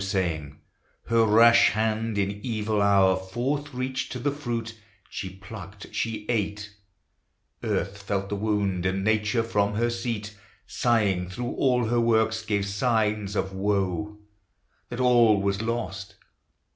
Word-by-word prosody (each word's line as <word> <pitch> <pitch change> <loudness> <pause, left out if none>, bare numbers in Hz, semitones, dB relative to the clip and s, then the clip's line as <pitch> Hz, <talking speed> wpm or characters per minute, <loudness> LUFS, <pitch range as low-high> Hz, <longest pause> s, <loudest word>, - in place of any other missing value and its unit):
So 95 - -3
saying, 80 -7 -2 0.5
her 115 -1 +4
rash 115 +2 +6
hand 110 0 -1
in 100 +1 -2
evil 110 -3 -1
hour 100 -2 +4
Forth 125 +10 -3
reaching 130 0 -3
to - - -4
the 140 +3 -1
fruit, 115 -5 -4 0.4
she 95 - -5
plucked, 100 -1 -10
she 110 -2 -2
eat: 105 -2 -2 0.9
Earth 100 +1 -2
felt 100 -1 -2
the 105 - -2
wound, 100 -3 0
and 95 +1 -1
Nature 110 +2 +1
from 105 -2 0
her 120 +2 +1
seat 115 -3 -4 0.3
Sighing 100 -7 +1
through 120 +6 -4
all 125 -3 +2
her 120 +2 +1
works 110 -1 +2
gave 100 -2 0
signs 105 -1 0
of 95 -1 -1
woe, 100 0 -1 0.7
That 120 - -6
all 120 -4 +5
was 100 0 0
lost. 100 -4 -4
105 Hz, 140 wpm, -26 LUFS, 100-115 Hz, 0.9 s, rash